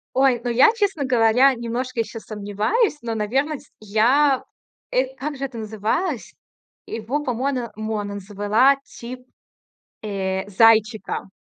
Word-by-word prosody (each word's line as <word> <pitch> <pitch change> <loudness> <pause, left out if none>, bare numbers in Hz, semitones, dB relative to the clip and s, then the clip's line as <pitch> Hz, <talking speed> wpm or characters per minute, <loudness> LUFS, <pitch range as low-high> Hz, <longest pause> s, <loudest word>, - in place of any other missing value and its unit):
Ой, 260 -2 +3
ну, 245 - -1
я, 255 - +6
честно 400 -9 0
говоря, 250 +1 +4
немножко 240 +1 -3
ещё 225 0 -4
сомневаюсь, 215 - -1
но, 230 -1 -3
на 210 -1 -1
верность, 280 +5 -2
я, 250 +7 +3 0.5
эт 260 +1 0
как 290 +2 -4
же 275 - -4
это 260 -4 -6
называлось? 220 - -2 0.5
Его, 235 +7 -3
по 260 - -1
мона 250 0 -2
монэн 210 -2 -3
звэла 205 +7 +3
тип, 250 +2 -9 0.8
э, 195 -1 -3
зайчика. 215 -1 +3
235 Hz, 130 wpm, -22 LUFS, 215-270 Hz, 0.8 s, я